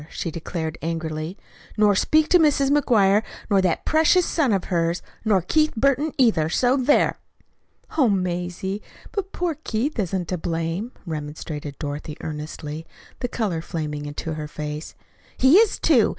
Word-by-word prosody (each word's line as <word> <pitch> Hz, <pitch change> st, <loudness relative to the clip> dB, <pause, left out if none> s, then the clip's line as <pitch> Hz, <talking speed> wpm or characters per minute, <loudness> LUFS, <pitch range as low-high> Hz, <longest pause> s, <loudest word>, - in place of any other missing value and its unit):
she 165 Hz, -, -4 dB
declared 160 Hz, 0 st, -4 dB
angrily; 160 Hz, +1 st, -3 dB, 0.4 s
"nor 210 Hz, -1 st, +5 dB
speak 310 Hz, +9 st, +3 dB
to 360 Hz, -, +5 dB
Mrs. 280 Hz, -3 st, +3 dB
McGuire, 215 Hz, -8 st, +4 dB, 0.3 s
nor 195 Hz, -1 st, +5 dB
that 180 Hz, -3 st, 0 dB
precious 320 Hz, +3 st, +4 dB
son 290 Hz, -8 st, +1 dB
of 195 Hz, -3 st, +1 dB
hers, 170 Hz, -1 st, 0 dB, 0.2 s
nor 205 Hz, -5 st, +2 dB
Keith 310 Hz, -, +2 dB
Burton, 275 Hz, +5 st, +2 dB
either. 210 Hz, -12 st, +3 dB
So 245 Hz, +8 st, +3 dB
there!" 275 Hz, +2 st, +3 dB, 0.8 s
"Oh, 260 Hz, -5 st, +5 dB
Mazie, 180 Hz, +1 st, -2 dB, 0.3 s
but 395 Hz, -2 st, -3 dB
poor 345 Hz, -4 st, -2 dB
Keith 240 Hz, +5 st, -1 dB
isn't 185 Hz, -2 st, -1 dB
to 180 Hz, -, -2 dB
blame," 165 Hz, +7 st, -2 dB
remonstrated 150 Hz, -2 st, -5 dB
Dorothy 150 Hz, +1 st, -5 dB
earnestly, 155 Hz, 0 st, -6 dB, 0.3 s
the 245 Hz, -, -1 dB
color 205 Hz, -9 st, -2 dB
flaming 150 Hz, -3 st, -4 dB
into 150 Hz, +2 st, -4 dB
her 155 Hz, -1 st, -5 dB
face. 150 Hz, +1 st, -6 dB, 0.4 s
"He 265 Hz, +7 st, +6 dB
is, 445 Hz, -1 st, +4 dB
too. 255 Hz, -9 st, +4 dB
185 Hz, 150 wpm, -23 LUFS, 160-260 Hz, 0.8 s, He